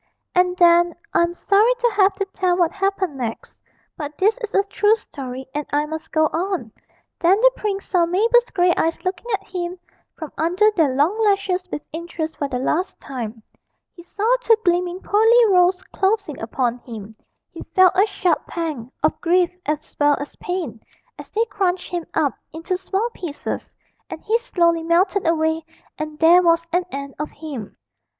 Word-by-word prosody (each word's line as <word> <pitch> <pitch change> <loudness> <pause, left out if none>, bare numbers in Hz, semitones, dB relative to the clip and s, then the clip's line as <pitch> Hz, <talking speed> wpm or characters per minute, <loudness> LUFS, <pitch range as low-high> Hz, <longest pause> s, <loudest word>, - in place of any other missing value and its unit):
And 360 0 +2
then 345 -1 +5 0.2
I - - +4
am 340 0 0
sorry 420 +7 +3
to 480 -1 +1
have 395 -1 +4
to 395 0 -2
tell 365 -2 +1
what 345 -2 +2
happened 390 -6 -1
next, 235 -3 -6 0.3
but 295 -1 -7
this 420 +4 +3
is 440 -3 -5
a 395 - +4
true 415 +2 +2
story 265 - -8
and 295 +1 -2
I 295 +1 +1
must 315 +1 -7
go 315 - +3
on 345 - -2 0.5
then 365 +4 +4
the - - +6
prince 400 -2 -3
saw 350 -3 +2
Mabel's 465 +7 +3
grey 355 -2 +3
eyes 325 0 +1
looking 370 +4 -3
at 400 -2 -1
him 360 -1 -5 0.4
from 315 -4 -7
under 365 +7 +3
their 315 -10 +1
long 355 +11 +2
lashes 395 -3 +1
with 295 - -4
interest 325 -1 -5
for 285 - -1
the 260 -2 -3
last 315 +8 -1
time, 230 -4 -6 0.5
he 345 - -13
saw 400 +4 -5
two 465 -2 +4
gleaming 355 +1 +1
pearly 450 +3 +4
rows 365 -1 +3
closing 390 -6 0
upon 240 +1 -1
him, 220 -3 -10 0.4
he - - -10
felt 370 -1 +6
a 390 +3 +4
sharp 370 -3 0
pang, 300 -8 -4
of 310 - +1
grief 350 0 +3 0.2
as 300 0 -3
well 290 0 +4
as 285 - -7
pain, 340 -11 -4 0.4
as - - -10
they 450 +2 0
crunched 375 -4 -2
him 345 -2 -3
up 300 -4 +2 0.2
into 330 +4 -3
small 385 +4 -1
pieces, 320 -6 -6 0.4
and - - -8
he 455 +2 +1
slowly 340 -8 +1
melted 345 +3 +1
away 320 0 +1 0.4
and 310 0 -5
there 335 +3 +6
was 335 -1 +3
an 355 0 +2
end 280 0 -6
of 300 - -3
him. 285 -9 -8
350 Hz, 180 wpm, -21 LUFS, 310-390 Hz, 0.5 s, the